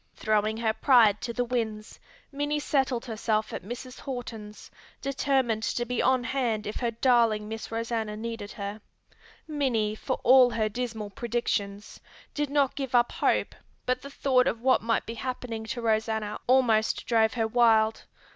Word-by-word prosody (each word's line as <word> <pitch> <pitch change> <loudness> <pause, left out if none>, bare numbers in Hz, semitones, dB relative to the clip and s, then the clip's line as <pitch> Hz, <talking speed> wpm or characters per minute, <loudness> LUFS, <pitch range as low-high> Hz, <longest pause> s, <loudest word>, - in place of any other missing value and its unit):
Throwing 215 0 0
her 225 -1 0
pride 225 -5 +4
to 235 - -3
the 245 +1 -1
winds, 220 -3 -3 0.3
Minnie 290 +1 -1
settled 265 -4 0
herself 220 -2 -1
at - - -4
Mrs. 245 +6 -8
Horton's, 225 -5 -7 0.3
determined 265 -4 0
to 240 +2 -1
be 245 0 -1
on 260 -1 +2
hand 235 -4 -1
if 210 - -4
her 240 - -1
darling 230 -3 +2
Miss 225 +1 -6
Rosanna 225 -2 -2
needed 225 -2 -6
her. 205 0 -6 0.7
Minnie, 255 -9 0
for 260 +4 -3
all 255 0 +7
her 220 -2 0
dismal 220 -2 -4
predictions, 215 -4 -3 0.3
did 295 -1 -1
not 280 -2 +2
give 270 -3 -3
up 240 0 +4
hope - - 0 0.3
but 255 0 0
the 280 - -9
thought 260 -2 +2
of 225 - -1
what 260 0 +4
might 230 0 0
be 230 - -5
happening 235 -1 -5
to 240 +2 -4
Rosanna 220 -1 0
almost 240 -4 +3
drove 225 0 +2
her 225 -2 +1
wild. 220 -2 +3
230 Hz, 160 wpm, -27 LUFS, 220-255 Hz, 0.7 s, all